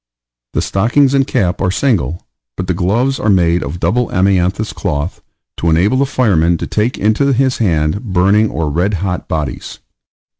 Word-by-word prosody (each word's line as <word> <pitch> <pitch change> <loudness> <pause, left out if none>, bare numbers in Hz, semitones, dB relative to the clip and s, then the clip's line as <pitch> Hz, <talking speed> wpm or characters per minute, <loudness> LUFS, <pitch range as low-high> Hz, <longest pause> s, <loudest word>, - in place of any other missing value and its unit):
The - - 0
stockings 125 +8 +2
and 135 -1 +2
cap 95 -8 -1
are 95 - +1
single, 90 - -1 0.3
but 95 - -3
the 90 - -1
gloves 115 +10 0
are 110 - 0
made 85 -3 +3
of 75 +4 -5
double 115 +9 +1
amianthus 95 +2 +1
cloth, 80 -3 -3 0.4
to 85 - 0
enable 90 +10 +2
the 140 +1 +1
fireman 85 - +2
to - - -4
take 110 +4 -1
into 110 +7 +1
his 130 +1 +1
hand 85 0 0
burning 100 +1 +2
or 80 -1 -2
red 90 +7 0
hot 90 -2 -3
bodies. 75 -5 -4
95 Hz, 165 wpm, -15 LUFS, 85-115 Hz, 0.4 s, made